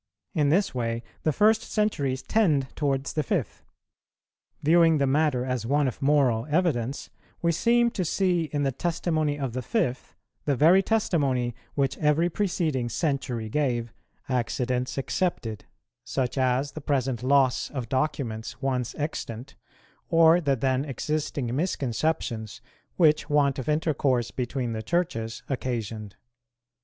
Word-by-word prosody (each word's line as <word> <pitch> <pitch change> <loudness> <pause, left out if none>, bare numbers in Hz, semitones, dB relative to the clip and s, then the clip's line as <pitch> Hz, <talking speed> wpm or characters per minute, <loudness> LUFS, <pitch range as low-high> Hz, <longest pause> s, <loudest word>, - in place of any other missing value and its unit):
In 150 -5 +2
this 190 +6 +2
way 115 -2 -2 0.2
the 155 - +1
first 215 +6 +4
centuries 140 - -1
tend 155 -12 +1
towards 140 -2 -1
the 155 - +1
fifth. 145 - -2 1.0
Viewing 165 +1 +5
the 140 - +2
matter 135 -2 +1
as 125 -3 -2
one 140 +4 +2
of 125 - -5
moral 135 -5 +2
evidence, 145 -6 0 0.3
we 170 - +3
seem 235 +7 +3
to 190 - -2
see 175 0 +1
in 145 -1 -2
the 135 - +1
testimony 155 0 -1
of 135 -5 -3
the 130 - -2
fifth 130 - -2 0.3
the 145 - +2
very 165 +8 +6
testimony 140 - +1 0.2
which 135 -2 0
every 155 +3 +2
preceding 160 -10 -1
century 125 -3 -2
gave, 120 -3 -1 0.3
accidents 125 0 -1
excepted, 130 - -2 0.4
such 125 +1 -2
as 130 +1 +1
the 155 - -8
present 130 -4 -1
loss 130 0 +2
of 130 -5 -5
documents 120 -4 -2
once 130 -3 -2
extant, 140 -4 -5 0.5
or 165 +1 +6
the 140 -4 +2
then 130 +1 0
existing 145 -3 -2
misconceptions 125 - -2 0.4
which 155 -3 +3
want 140 -2 +2
of 130 - -4
intercourse 145 -6 +1
between 125 -1 -3
the 110 - -3
Churches 115 -6 -2
occasioned. 115 -6 -4
140 Hz, 135 wpm, -26 LUFS, 125-155 Hz, 1.0 s, very